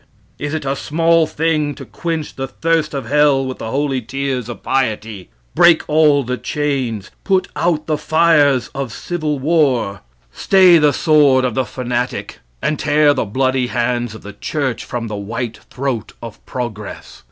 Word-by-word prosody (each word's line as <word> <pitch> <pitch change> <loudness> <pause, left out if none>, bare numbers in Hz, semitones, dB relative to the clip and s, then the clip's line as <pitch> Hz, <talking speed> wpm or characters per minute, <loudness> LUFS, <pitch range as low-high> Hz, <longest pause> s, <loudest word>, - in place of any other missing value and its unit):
Is 145 +2 -3
it 155 - -4
a 135 +1 0
small 165 +3 +2
thing 150 -2 0
to - - -9
quench 165 -3 -4
the 135 0 -4
thirst 160 +2 -1
of 135 - -3
hell 145 -2 +3
with 130 0 -5
the 110 - -5
holy 135 0 -1
tears 130 0 -3
of 120 - -8
piety, 110 - -2 0.2
break 170 -2 +5
all 150 -2 +4
the 125 0 -3
chains, 130 -7 -2
put 190 -2 +1
out 160 -1 0
the 155 -1 -1
fires 150 -6 +3
of 135 -3 -4
civil 155 +1 -3
war, 135 - +1 0.3
stay 185 -3 +5
the 150 -1 +4
sword 140 -3 +4
of 125 - -1
the 130 +2 0
fanatic, 125 -4 -3 0.2
and 150 - 0
tear 150 0 +3
the - - -1
bloody 130 +3 0
hands 120 -1 -1
of 110 - -12
the 105 - -9
church 130 +3 -3
from 120 -1 -4
the 105 - -5
white 115 +3 -5
throat 130 -3 -3
of 115 -3 -10
progress? 110 -5 -6
135 Hz, 165 wpm, -18 LUFS, 120-155 Hz, 0.3 s, break